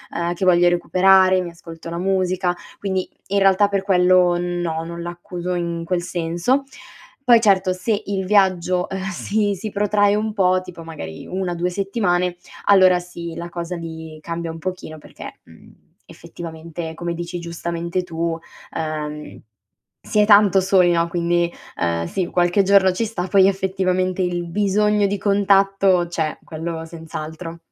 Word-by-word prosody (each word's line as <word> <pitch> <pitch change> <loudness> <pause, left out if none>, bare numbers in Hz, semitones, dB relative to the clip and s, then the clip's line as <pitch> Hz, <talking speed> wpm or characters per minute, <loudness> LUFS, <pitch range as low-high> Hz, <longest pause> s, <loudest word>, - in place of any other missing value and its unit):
ehm, 170 +1 -1
che 190 - -2
voglio 175 -1 +5
recuperare, 185 +1 +4
mi 175 - -5
ascolto 165 -1 -11
la 170 - -5
musica; 185 -1 0 0.2
quindi 190 -2 -2 0.2
in 200 +1 +2
realtà 195 +1 +4
per 200 -1 0
quello 180 -2 +4
no, 175 -2 -2
non 170 +1 -7
l'accuso 175 +1 -5
in 170 -1 -3
quel 175 +1 -1
senso. 175 +10 0 0.6
Poi 240 -3 +6
certo 190 -3 +3
se 210 +3 -2
il 195 -1 -2
viaggio, 185 -3 +2
ehm, 190 0 -5
si 205 +2 -1
si 210 +3 -6
protrae 205 0 +2
un 215 +1 -1
po', 185 -2 +2
tipo 180 -2 -10
magari 115 - -8
1-2 180 -1 -2
settimane, 180 -2 0 0.3
allora 185 -3 +6
sì 170 -1 -8
la 170 0 -6
cosa 170 +1 -5
mi 160 -1 -8
cambia 165 0 -4
un 165 - -9
pochino 160 -3 -6
perché, - - -11
mhmm, - - -19 0.2
effettivamente 165 0 -8
come 170 +1 -4
dici 175 +1 -5
giustamente 170 +1 -3
tu, 165 -1 -3 0.4
ehm, 150 -1 -5 0.6
si 210 - -1
è 210 - +5
tanto 205 -2 +6
soli, 185 -2 +4
no; 170 0 +1
quindi, 175 0 0 0.3
ehm, 85 -1 -1
sì, 185 - -2
qualche 175 +2 +2
giorno 190 -1 +5
ci 210 - -1
sta, 195 -5 -4
poi 190 0 +5
effettivamente 185 -1 -1
il 175 -1 -1
bisogno 210 +2 +2
di 200 +1 -2
contatto 195 -2 +3
c'è, 160 -2 -2
quello 165 0 -5
senz'altro. 160 0 -8
180 Hz, 155 wpm, -21 LUFS, 170-195 Hz, 0.6 s, Poi